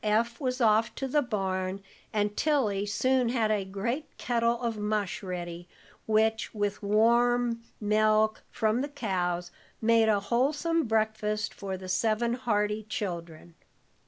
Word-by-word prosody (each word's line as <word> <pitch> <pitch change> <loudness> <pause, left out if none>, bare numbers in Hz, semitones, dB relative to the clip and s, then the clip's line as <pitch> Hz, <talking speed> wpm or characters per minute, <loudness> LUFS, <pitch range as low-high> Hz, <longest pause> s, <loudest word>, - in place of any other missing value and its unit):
Eph 230 +5 +1
was 255 -1 -1
off 220 -1 +3
to 270 - -3
the 295 +3 +2
barn, 190 -5 -2 0.3
and 205 -1 0
Tilly 215 -10 +1
soon 255 +4 +2
had 230 -3 +1
a 210 -2 +1
great 235 +10 -3
kettle 235 -1 +1
of 230 -1 -1
mush 210 -2 -2
ready, 175 -2 -6 0.4
which, 220 +1 +1
with 205 -1 -1
milk 200 -1 -4
warm 235 +2 +3 0.9
from 220 +2 0
the 280 - -1
cows, 180 -9 -2 0.3
made 225 0 +4
a 210 -2 +3
wholesome 285 +10 +1
breakfast 215 -1 0
for 195 -2 -5
the 185 0 -9
seven 220 +5 +1
hearty 210 -3 0
children. 170 -5 -5
215 Hz, 135 wpm, -28 LUFS, 200-235 Hz, 0.9 s, made